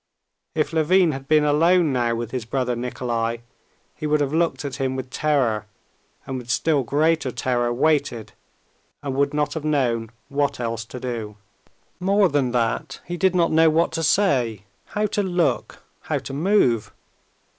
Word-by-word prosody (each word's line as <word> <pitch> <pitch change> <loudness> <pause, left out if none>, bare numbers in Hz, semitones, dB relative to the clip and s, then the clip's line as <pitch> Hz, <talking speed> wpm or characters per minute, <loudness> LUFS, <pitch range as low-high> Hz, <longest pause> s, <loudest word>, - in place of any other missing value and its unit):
If 155 +1 0
Levin 165 +2 +4
had 135 -1 -7
been 155 0 +4
alone 160 +1 +3
now 120 -2 +1
with 115 -1 -4
his 130 -3 -3
brother 125 +1 -1
Nikolay, 120 -1 -2 0.5
he 155 - -4
would 150 0 +2
have 145 0 -1
looked 165 -2 0
at 140 - -4
him 130 -1 -1
with 130 -1 -6
terror, 125 -9 0 0.6
and 135 -1 -4
with 120 -1 -12
still 150 +2 +2
greater 150 +3 +1
terror 120 -1 0
waited, 130 -5 0 0.7
and 140 -2 -3
would 140 +1 +1
not 150 -1 -1
have 160 - -4
known 125 -7 0 0.2
what 140 -1 -1
else 115 -1 -3
to 125 +3 -8
do. 115 -4 -5 0.6
More 195 +1 +3
than 140 -4 +1
that, 120 -2 -1
he 175 - -4
did 185 +2 +2
not 170 -2 +3
know 160 0 +5
what 160 +2 +2
to 165 0 -2
say, 130 - +2 0.2
how 210 +1 -1
to 210 - 0
look, 175 - -1 0.2
how - - -2
to - - -7
move. 135 - +2
140 Hz, 165 wpm, -23 LUFS, 120-160 Hz, 0.7 s, know